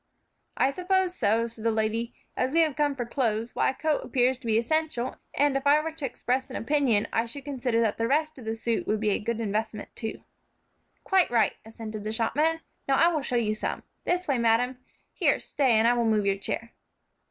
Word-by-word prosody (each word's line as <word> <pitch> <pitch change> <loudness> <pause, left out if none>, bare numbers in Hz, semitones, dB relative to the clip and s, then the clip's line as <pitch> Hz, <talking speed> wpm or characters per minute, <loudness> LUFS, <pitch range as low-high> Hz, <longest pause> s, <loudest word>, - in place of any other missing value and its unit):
"I 270 - +3
suppose 370 +2 +1
so," 225 - +2
said 230 -1 -9
the - - +1
old 220 - -1
lady, 225 +2 0 0.2
"as 260 +2 0
we 330 - +5
have 310 -4 +2
come 290 -2 +1
for 245 -3 -3
clothes; 230 -2 -1
why, - - +2
a 265 - -3
coat 310 +1 0
appears 255 -1 +1
to 240 - -8
be 220 -1 +3
essential, 260 0 0 0.2
and 285 -1 +3
if 275 +1 0
I 290 +1 +6
were 320 +1 -3
to 315 -3 -5
express 260 +2 -2
an 260 - -7
opinion, 250 -5 +1
I 230 +1 +1
should 275 +4 -8
consider 255 -5 -1
that 220 -2 0
the 230 - +1
rest 310 +1 0
of 240 - -10
the 225 0 -2
suit 225 0 -1
would 215 - +1
be 215 -1 +1
a - - +1
good 230 +1 -2
investment, 215 0 -3
too." 220 -2 -5 0.8
"Quite 380 -2 +3
right," 235 -2 +3
assented 220 -1 -7
the 215 - -3
shopman. 300 +9 +1 0.3
"Now 270 - +3
I 335 +5 +5
will 315 -3 -1
show 250 - -3
you 220 -3 +1
some. 215 - -3 0.2
This 360 +1 0
way, 275 -4 +1
madam; 240 +2 +2 0.3
here, - - +2
stay, 265 -4 +1
and 220 +1 +4
I 240 - +5
will 240 -1 +1
move 215 -2 +2
your 195 0 +2
chair." 230 +4 -4
245 Hz, 225 wpm, -27 LUFS, 225-285 Hz, 0.8 s, I